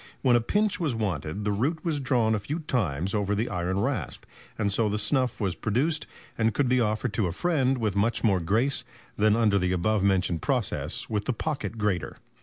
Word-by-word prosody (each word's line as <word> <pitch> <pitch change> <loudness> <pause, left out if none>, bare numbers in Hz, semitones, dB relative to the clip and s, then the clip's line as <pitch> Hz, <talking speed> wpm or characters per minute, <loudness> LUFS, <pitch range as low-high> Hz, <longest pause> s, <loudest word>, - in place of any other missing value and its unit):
When 125 -3 +5
a 120 - +4
pinch 205 - +1
was 155 -8 0
wanted, 100 -3 -3
the 105 - +1
root 145 - -1
was 160 -4 0
drawn 125 -5 +2
a 110 - +1
few 140 +11 -4
times 95 - -1
over 105 -1 0
the 110 +4 -1
iron 90 +1 -1
rasp, - - -2 0.3
and 100 -2 0
so 110 +1 +2
the 105 - -1
snuff 125 +5 0
was 95 -5 0
produced 140 - 0 0.3
and 110 -1 +2
could 145 - +2
be 125 0 +3
offered 110 +1 -1
to 105 -5 +1
a - - -2
friend 135 - +1
with 110 -5 -1
much 110 +2 +1
more 100 -5 +3
grace 110 +11 +1 0.3
than 105 0 +3
under 105 -4 +3
the 90 0 0
above 105 +4 +1
mentioned 95 -4 +1
process - - -1
with 105 -2 -2
the - - 0
pocket 115 -5 -3
grater." 105 -4 -1
110 Hz, 210 wpm, -27 LUFS, 100-125 Hz, 0.3 s, When